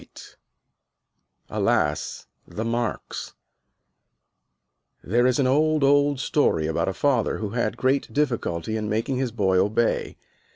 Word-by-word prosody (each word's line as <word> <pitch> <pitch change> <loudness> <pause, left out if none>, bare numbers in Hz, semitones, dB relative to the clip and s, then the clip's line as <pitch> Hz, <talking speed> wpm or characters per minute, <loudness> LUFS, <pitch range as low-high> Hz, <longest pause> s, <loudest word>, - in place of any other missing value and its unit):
"_ - - -15 1.1
ALAS, - - -1 0.2
THE 110 - -5
MARKS 120 0 -3 1.7
There 120 +6 +2
is 125 - +2
an 140 - +2
old, 155 +3 +2
old 145 0 +3
story 135 - +1
about 80 +1 -1
a - - -3
father 130 -6 +1
who 105 -2 -4
had 120 +1 -1
great 135 +2 0
difficulty 110 - -1
in 105 -1 -3
making 115 +5 -1
his 130 -2 -1
boy 95 -5 +2
obey. 110 +4 0
120 Hz, 125 wpm, -24 LUFS, 105-140 Hz, 1.7 s, old